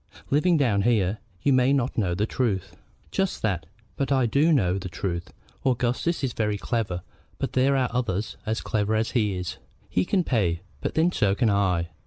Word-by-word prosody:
Living 165 +4 +4
down 115 -9 +2
here, 105 -2 +2 0.2
you 140 - +4
may 130 +1 +4
not 135 -3 +1
know 90 -6 0
the 105 +4 +1
truth." 110 -6 -1 0.4
"Just 190 -1 -1
that. 90 -8 -1 0.3
But 140 0 -1
I 130 -2 +3
do 140 +8 +3
know 95 - +2
the 95 -1 -6
truth. 85 -1 -4 0.3
Augustus 130 +6 0
is 130 -3 0
very 105 -2 0
clever; 100 -6 -2 0.3
but - - -3
there 135 +2 +3
are 130 -2 +2
others 110 -4 -1
as 110 0 -2
clever 110 0 0
as 110 +1 0
he 105 -6 +1
is. 90 -1 -4 0.3
He 90 - +2
can 185 - +1
pay, 90 - 0 0.2
but - - -3
then 165 +3 +3
so 100 - +2
can 115 -1 +2
I. 90 -4 +1
110 Hz, 190 wpm, -26 LUFS, 95-130 Hz, 0.4 s, Living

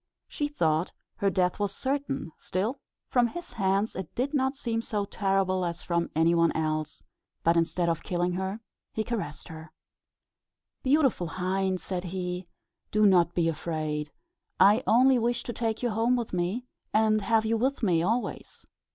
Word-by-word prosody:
She 295 - -2
thought 165 - 0 0.2
her 200 - +2
death 180 0 +1
was 200 -1 -1
certain 275 - -2
still, 215 +9 -2 0.3
from 245 -2 +3
his 345 +8 -8
hands, 195 +1 +1
it 190 -3 -6
did 265 +4 -1
not 265 -1 +1
seem 230 -4 -2
so 210 -3 -2
terrible 195 -2 0
as 170 -2 -3
from 170 -1 0
any 165 +2 +4
one 170 -1 +4
else; 155 -1 -2 0.4
but 170 +1 +4
instead 170 +1 +1
of 165 -1 0
killing 175 0 -1
her 190 +4 -3 0.3
he 220 - -1
caressed 210 -11 -4
her. 160 0 -10 1.1
"Beautiful 270 - +2
hind," 185 +1 -1
said 185 -1 -4
he, 180 0 -4 0.4
"do 215 0 +4
not 175 -3 +4
be 170 -2 +2
afraid. 155 -2 -2 0.5
I 205 +5 +6
only 255 +2 +5
wish 240 +1 0
to 240 - -5
take 225 0 -2
you 240 - +1
home 225 +3 +2
with 235 -5 -3
me, 185 +8 -1 0.3
and 215 0 +3
have 220 +2 +2
you 225 +1 +2
with 255 +3 0
me 175 -5 +3
always." 225 +8 -2
195 Hz, 165 wpm, -28 LUFS, 175-230 Hz, 1.1 s, I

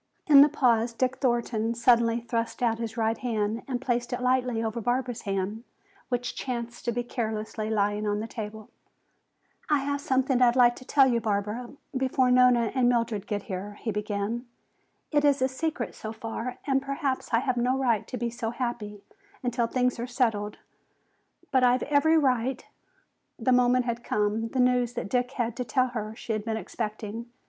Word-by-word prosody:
In 285 -3 +8
the 290 - +7
pause 240 -5 +2
Dick 255 +2 0
Thornton 235 -3 0
suddenly 235 -1 +3
thrust 230 +1 -3
out 225 -1 +1
his 230 0 -5
right 225 0 0
hand 225 -2 -1
and 255 -3 -2
placed 240 -2 -1
it 245 - -2
lightly 250 -2 +1
over 225 +1 -2
Barbara's 245 +1 -1
hand, 195 +3 -2 0.5
which 245 -1 -2
chanced 235 -2 -5
to 235 - +1
be 240 +1 -2
carelessly 220 -2 -3
lying 210 0 0
on 205 0 0
the 220 - -3
table. 215 -1 -7 1.0
"I 300 - +4
have 285 +1 -2
something 265 -2 +1
I'd 245 -1 +5
like 240 -1 +5
to 255 - -12
tell 275 0 +5
you, 235 -2 +1
Barbara, 210 +3 -2 0.3
before 260 -1 +2
Nona 250 -2 +5
and 255 -2 +3
Mildred 230 -4 0
get 205 -2 -2
here," 205 +2 -6
he 225 - -2
began. 210 +3 -3 0.6
"It 295 -2 +3
is 285 -1 +4
a 260 - +3
secret 265 -1 -3
so 215 - -6
far 230 +3 -5
and 270 -1 +2
perhaps 275 -1 -2
I 230 - +4
have 255 +1 0
no 250 +2 +1
right 235 -6 +1
to 250 - -5
be 235 0 -2
so 230 -1 -3
happy 230 -4 -4 0.4
until 240 -1 0
things 250 0 0
are 240 - -3
settled. 225 -5 0 0.9
But 260 -2 +3
I've 250 +1 +4
every 295 +3 +3
right 260 -3 +1 0.4
" - - -46 0.3
The 245 +2 +1
moment 250 0 +4
had 235 0 -3
come! 210 +1 0
The 260 - -3
news 250 -1 +3
that 200 - -4
Dick 250 +2 0
had 235 -3 -2
to 250 - -1
tell 255 +2 +1
her 220 -2 -5
she 230 - -4
had 215 -1 -2
been 220 0 -2
expecting. 220 +1 -5
240 Hz, 185 wpm, -27 LUFS, 220-255 Hz, 1.0 s, In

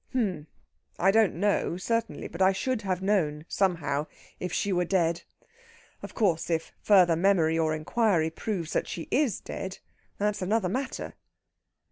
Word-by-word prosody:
"H'm!... 190 -12 -1 0.5
I 190 +3 +4
don't 220 -2 +3
know, 195 -2 0
certainly. 230 +5 -2
But 170 - -7
I 190 +1 +5
should 230 +4 -1
have 190 -2 -2
known, 160 -7 0
somehow, 160 -6 0 0.3
if 180 - -4
she 200 +2 0
were 180 0 +2
dead. 170 -2 +1 0.8
Of - - -9
course, 175 -8 +1
if 165 -1 -1
further 180 -5 +5
memory 165 -3 +3
or 155 -1 +1
inquiry 165 0 +1
proves 175 -3 -4
that - - 0
she 165 - -6
is 265 - +1
dead, 190 0 -6 0.4
that's 210 0 -1
another 190 0 +1
matter." 260 +7 -4
185 Hz, 150 wpm, -28 LUFS, 165-205 Hz, 0.8 s, I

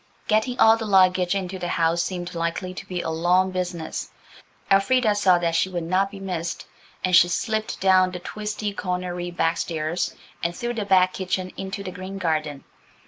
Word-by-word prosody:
Getting 220 +4 +1
all 225 0 +7
the 225 -1 -4
luggage 185 -1 +4
into 190 -1 -3
the 175 - -3
house 170 0 +1
seemed 175 -1 -4
likely 170 +2 -3
to - - -9
be 180 -1 -3
a 160 - -2
long 180 +3 +2
business. 180 -3 -4 0.6
Elfrida 215 +3 +4
saw 195 -3 +4
that 170 -1 0
she 170 +3 +2
would 175 -2 -3
not 185 +4 +1
be 200 -1 -10
missed, 175 -3 -4 0.4
and 185 -1 +3
she 175 - +7
slipped 215 +4 -2
down 185 -1 +4
the 180 - -6
twisty 210 +2 -4
cornery 180 -2 -3
back 165 -1 0
stairs 160 +1 -2 0.3
and 170 0 -1
through 240 +4 -3
the 220 -3 -3
back 185 -2 +4
kitchen 185 0 -2
into 195 +1 -5
the 185 - -5
green 185 +2 -7
garden. 155 -5 -2
185 Hz, 185 wpm, -24 LUFS, 175-195 Hz, 0.6 s, all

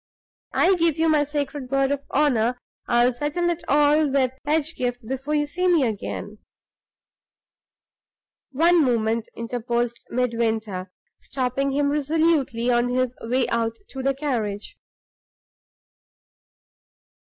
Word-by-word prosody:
I 375 - +4
give 330 -2 +2
you 325 0 +2
my 305 -2 +4
sacred 290 -2 -4
word 275 0 +1
of 285 -1 -1
honor 250 -5 +2 0.3
I'll 240 +1 +3
settle 300 +7 -1
it 340 0 -4
all 295 +1 +4
with 265 -2 +2 0.2
Pedgift 280 -6 -1
before 270 +4 -2
you 295 0 +2
see 360 +5 -1
me 340 -5 +4
again." 215 -1 -5 2.1
"One 330 +4 +4
moment," 230 -3 0
interposed 235 0 -3
Midwinter, 225 -6 -1 0.3
stopping 265 +1 -2
him 285 0 +1
resolutely 295 -5 +1
on 240 0 +2
his 255 0 0
way 250 +3 0
out 230 -1 0
to 265 - -6
the 275 +1 0
carriage. 225 -8 -3
265 Hz, 115 wpm, -23 LUFS, 235-295 Hz, 2.1 s, I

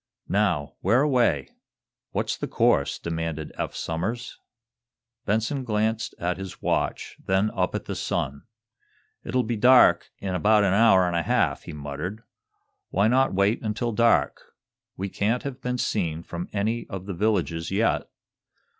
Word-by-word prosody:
"Now, 95 -8 +1
whereaway? 120 - +2 0.6
What's - - -1
the - - -4
course?" 70 - +2
demanded 80 -2 -4
Eph - - -4
Somers. 105 +10 -4 0.9
Benson 110 +6 0
glanced 110 -1 -1
at 90 +1 -2
his 95 -1 -7
watch, - - -2
then 95 +3 +1
up 90 -1 -1
at - - -4
the - - -4
sun. 70 +2 -2 0.8
"It'll 125 -1 0
be 115 +1 -2
dark 125 +4 +6
in 95 -2 -4
about 105 +3 +4
an 95 -2 +2
hour 100 -3 +5
and 85 - -1
half," 85 -2 +1
he - - -7
muttered. 75 +9 -6 0.7
"Why 100 +3 +2
not 130 -3 +2
wait 100 +4 +2
until 115 +2 -2
dark? 115 +1 +2 0.6
We 95 - -3
can't 110 +5 -1
have 135 -2 -6
been 125 0 -2
seen 85 -9 -1
from 85 +1 -6
any 110 +3 -1
of 95 -3 -6
the 100 - -4
villages 85 -4 0
yet. 105 +4 0
100 Hz, 145 wpm, -25 LUFS, 85-115 Hz, 0.9 s, dark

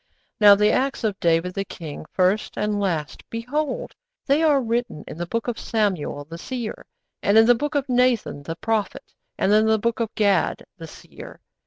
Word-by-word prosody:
'_Now 205 -1 +8
the 210 +1 +3
acts 270 0 0
of 210 -3 -1
David 170 +2 +1
the 195 - -2
king, 160 -5 -9
first 190 +3 0
and 210 0 -1
last, 165 -7 -2
behold, 295 - -3 0.3
they 285 +3 +2
are 300 -3 +4
written 235 - -2
in - - -7
the 175 - -3
book 230 +5 -3
of 240 -2 -3
Samuel 190 -10 -1
the 165 +3 -9
seer, 240 -1 -6 0.3
and 200 +2 +3
in 225 - +8
the 245 - +6
book 295 +6 -3
of 285 -1 0
Nathan 250 - +1
the 165 +3 -6
prophet, 215 +1 -3 0.2
and 200 - +2
in 215 +1 +4
the 220 0 +4
book 230 +2 -1
of 230 -2 -1
Gad 200 -4 +1
the 165 -3 -10
seer. - - -12
215 Hz, 190 wpm, -23 LUFS, 185-240 Hz, 0.3 s, Now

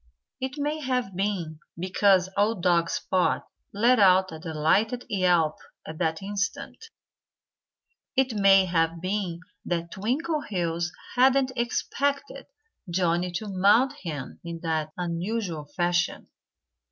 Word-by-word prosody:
It 260 0 -3
may 295 +2 -1
have 250 -8 -2
been 180 -5 -2 0.2
because 185 +1 +3
old 205 -2 +1
dog 170 -2 +3
Spot 185 -1 0 0.2
let 235 +4 +3
out 185 -2 +5
a 160 - -8
delighted 165 +10 0
yelp 175 -5 +2 0.3
at 155 0 -8
that 160 +1 -1
instant. 205 - -4 1.3
It 265 -2 +2
may 195 -2 +5
have 165 -1 0
been 185 -2 -3 0.2
that 170 -1 -3
Twinkleheels 205 - -2 0.2
hadn't 260 +1 +4
expected 280 +6 -2 0.4
Johnnie 175 0 +1
to 215 - -3
mount 205 +8 +4
him 150 -6 -6
in 170 -1 -6
that 160 -2 -1
unusual 175 -1 -3
fashion. 175 +4 -1
185 Hz, 115 wpm, -26 LUFS, 170-225 Hz, 1.3 s, out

